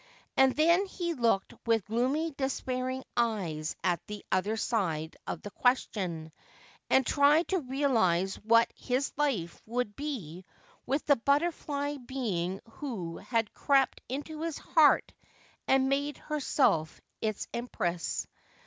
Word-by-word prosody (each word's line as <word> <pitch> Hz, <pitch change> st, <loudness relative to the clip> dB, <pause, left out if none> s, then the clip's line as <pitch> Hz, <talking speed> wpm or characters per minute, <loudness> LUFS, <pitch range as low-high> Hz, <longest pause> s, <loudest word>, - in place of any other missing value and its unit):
And 265 Hz, -1 st, +5 dB
then 340 Hz, +6 st, +4 dB
he 345 Hz, -2 st, -3 dB
looked 230 Hz, -8 st, +1 dB
with 225 Hz, -4 st, +2 dB
gloomy 260 Hz, +9 st, 0 dB
despairing 260 Hz, -1 st, -2 dB
eyes 185 Hz, -10 st, -1 dB
at 175 Hz, -3 st, +1 dB
the 210 Hz, -1 st, -7 dB
other 200 Hz, +4 st, +1 dB
side 165 Hz, -9 st, -1 dB
of -, -, -4 dB
the 205 Hz, -, -7 dB
question, 185 Hz, -11 st, 0 dB, 0.6 s
and 265 Hz, -1 st, +4 dB
tried 290 Hz, +6 st, +4 dB
to 380 Hz, -, +2 dB
realise 230 Hz, -, +1 dB
what 230 Hz, +2 st, +3 dB
his 260 Hz, +2 st, -1 dB
life 245 Hz, -, -1 dB
would 235 Hz, -3 st, -2 dB
be 200 Hz, -, -5 dB, 0.4 s
with 275 Hz, +4 st, 0 dB
the 285 Hz, -, +5 dB
butterfly 285 Hz, +1 st, 0 dB
being 210 Hz, -9 st, -3 dB
who 220 Hz, -, -5 dB
had 230 Hz, -3 st, -1 dB
crept 275 Hz, -2 st, +2 dB
into 295 Hz, +4 st, -5 dB
his 330 Hz, -2 st, -2 dB
heart 310 Hz, -3 st, +4 dB, 0.5 s
and 265 Hz, 0 st, +4 dB
made 285 Hz, +2 st, 0 dB
herself 270 Hz, -, +1 dB, 0.2 s
its 215 Hz, -2 st, -2 dB
empress. 180 Hz, -8 st, -2 dB
250 Hz, 125 wpm, -30 LUFS, 195-285 Hz, 0.6 s, And